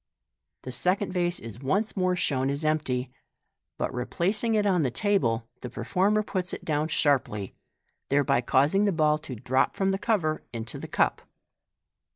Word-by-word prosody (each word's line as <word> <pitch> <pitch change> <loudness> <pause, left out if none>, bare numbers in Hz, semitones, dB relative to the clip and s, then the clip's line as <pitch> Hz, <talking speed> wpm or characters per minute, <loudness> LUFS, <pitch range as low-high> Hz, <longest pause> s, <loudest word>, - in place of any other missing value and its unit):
The 130 - -6
second 180 +10 0
vase 175 -1 0
is 115 0 -9
once 195 - 0
more 185 -2 +1
shown 135 -6 0
empty 145 -3 0
j 130 - -17 0.7
but - - -1
in - - -9
replacing 205 - 0
it 210 -1 +2
on 185 -4 +3
the 135 - +1
table, 120 - +1
the 125 - -5
performer 195 - +1
puts 185 -3 -2
it - - -6
down 155 0 0
sharply, 130 - +1 0.6
thereby 140 -3 +3
causing 145 +11 +3
the 200 - +3
ball 155 -3 +2
tc 130 -7 -9
drop 130 +1 +2
from 195 0 +1
the 195 0 0
cover 175 -9 0
into 115 -1 -6
the - - -7
cup. - - +1
155 Hz, 170 wpm, -27 LUFS, 130-195 Hz, 0.7 s, on